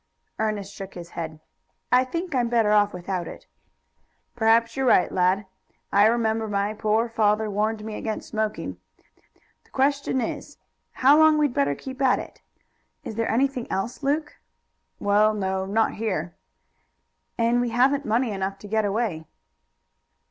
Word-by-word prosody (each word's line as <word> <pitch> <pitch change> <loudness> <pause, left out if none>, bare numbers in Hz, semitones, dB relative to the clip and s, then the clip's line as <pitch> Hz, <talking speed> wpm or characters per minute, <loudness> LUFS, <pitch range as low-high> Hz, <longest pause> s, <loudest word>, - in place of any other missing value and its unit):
Ernest 210 -2 -2
shook 195 0 -9
his 170 -1 -9
head. 160 -2 -6 0.5
"I 250 +1 +5
think 340 +6 -4
I'm 245 -3 +1
better 230 -3 +2
off 205 -1 +4
without 180 0 -4
it." - - -10 0.9
"Perhaps 230 0 +3
you're 265 -1 0
right, 210 - +4
lad. 185 +2 +2 0.5
I 205 +1 +6
remember 225 -1 +1
my 205 0 -1
poor 215 +2 +1
father 215 -1 +1
warned 215 +1 -1
me 220 - -5
against 215 0 -5
smoking. 215 -1 -3 0.8
The - - -28
question 275 0 +1
is, 230 - -5 0.4
how 280 +4 +5
long 315 -1 +6
we'd 295 -4 +2
better 140 -5 +1
keep 265 - -8
at 260 -2 +4
it." - - -9 0.6
"Is - - -6
there 230 +1 -1
anything 255 0 0
else, 210 +8 -3
Luke?" 295 +2 -1 0.6
"Well, 210 +1 +3
no; 190 -1 -2
not 220 +3 +1
here." 185 -6 -3 1.0
"And 235 +1 +2
we 245 - 0
haven't 265 +5 +2
money 230 +1 0
enough 195 0 -3
to 205 - -11
get 220 +1 +1
away." 200 -7 -2
220 Hz, 150 wpm, -24 LUFS, 200-245 Hz, 1.0 s, I